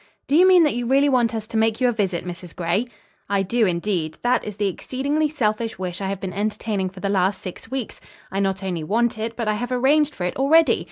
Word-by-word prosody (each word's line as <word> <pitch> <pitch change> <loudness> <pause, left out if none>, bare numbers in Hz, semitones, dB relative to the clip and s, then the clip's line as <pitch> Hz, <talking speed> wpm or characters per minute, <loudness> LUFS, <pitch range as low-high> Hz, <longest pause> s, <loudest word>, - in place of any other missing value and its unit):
"Do 280 - 0
you 360 +3 +7
mean 365 -2 +7
that 300 - +2
you 240 0 -3
really 275 +3 +4
want 245 -3 +2
us 220 -1 -3
to 220 - -4
make 225 +1 +2
you 255 - +3
a - - +3
visit, 195 -6 -2
Mrs. 175 -1 -8
Gray?" 180 +7 0 0.4
"I 200 -1 +1
do 225 +3 +1
indeed. 170 -3 -1
That 245 0 +2
is 210 - -6
the 205 0 0
exceedingly 280 - -1
selfish 225 -5 -1
wish 185 0 -4
I 195 - -2
have 195 -1 -3
been 190 -2 -5
entertaining 205 -1 -2
for 185 0 -12
the 200 - -1
last 195 0 +1
six 185 +4 -9
weeks. 260 -3 -5 0.3
I 195 - -2
not 195 -1 -1
only 175 -4 -3
want 225 +5 0
it, 225 +1 -3
but 230 -3 -3
I 215 - +2
have 240 +4 -4
arranged 285 +4 +2
for 180 - -5
it 180 - -2
already. 310 +5 +4
215 Hz, 245 wpm, -22 LUFS, 190-250 Hz, 0.4 s, you